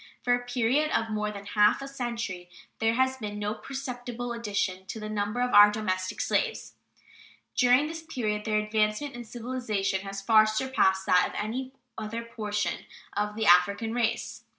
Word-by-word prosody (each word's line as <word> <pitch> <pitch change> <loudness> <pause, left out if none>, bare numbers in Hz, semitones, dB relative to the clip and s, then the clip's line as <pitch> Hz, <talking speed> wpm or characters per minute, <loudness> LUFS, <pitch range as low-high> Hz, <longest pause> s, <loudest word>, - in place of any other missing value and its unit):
For 245 - +3
a 245 0 0
period 245 +5 +1
of 225 -1 -3
more 210 0 -1
than 200 -1 -8
half 210 +1 +3
a 275 - -6
century 235 -9 -4 0.3
there 225 0 +2
has 260 +1 +2
been 210 -4 -5
no 210 0 -2
perceptible 245 -2 -5
addition 200 -5 -2
to 220 - -6
the 215 0 -6
number 210 +3 -1
of 250 0 0
our 205 0 +9
domestic 185 -3 -2
slaves. 465 -2 -1 0.8
During 250 +3 +5
this 325 +1 -5
period 225 -10 -3
their 215 -1 0
advancement 215 +6 0
in 240 -1 -8
civilization 225 -5 -2
has 195 0 -6
far 215 +1 +5
surpassed 215 -5 +1
that 180 - +4
of - - -10
any 255 +5 -3 0.3
other 225 +2 -4
portion 210 -3 -3 0.3
of 210 0 -1
the 220 0 -1
African 200 +5 +4
race. 235 -2 -1
220 Hz, 170 wpm, -28 LUFS, 210-245 Hz, 0.8 s, our